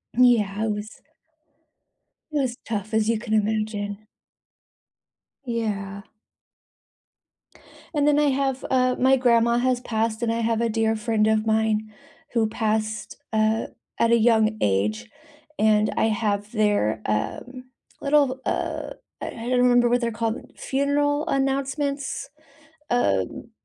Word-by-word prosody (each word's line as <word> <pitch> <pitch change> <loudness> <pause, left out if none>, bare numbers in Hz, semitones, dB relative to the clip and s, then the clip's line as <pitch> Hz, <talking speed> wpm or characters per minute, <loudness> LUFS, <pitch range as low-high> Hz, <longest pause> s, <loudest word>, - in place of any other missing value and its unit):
Yeah, 220 -4 +3
it 220 - 0
was 210 +1 -6 1.3
it 300 - -1
was 255 -4 -1
tough 215 -1 -4
as 220 0 +2
you 230 -2 +1
can 220 -1 -4
imagine. 215 -1 -1 1.4
Yeah. 200 -4 -3 1.9
And 290 0 +2
then 295 -1 +4
I 295 -1 +3
have, 270 -1 -1
uh, 255 -1 +3
my 265 +1 +4
grandma 235 -2 +3
has 250 0 +1
passed 225 -1 -1
and 230 - +1
I 230 - -1
have 230 0 0
a 235 - +1
dear 225 0 +1
friend 215 -1 +1
of 220 0 +2
mine 220 -1 +1 0.4
who 230 -2 +2
passed, 220 -1 -2
uh, 220 0 +1 0.3
at 230 - +3
a 235 - +6
young 220 -1 +3
age, 105 +2 0 0.5
and 215 0 +3
I - - +2
have 210 -1 -1
their, 205 - +1
um, 250 - -3 0.4
little, 280 -2 +2
uh, - - -2 0.3
I - - -4
I 230 +1 -6
don't 250 -1 +2
remember 245 -1 +4
what 245 +1 +2
they're 235 -1 0
called, 225 +1 -2 0.2
funeral 290 +3 0
announcements, 275 0 -1 0.6
um, 95 - 0
225 Hz, 130 wpm, -24 LUFS, 215-255 Hz, 1.9 s, a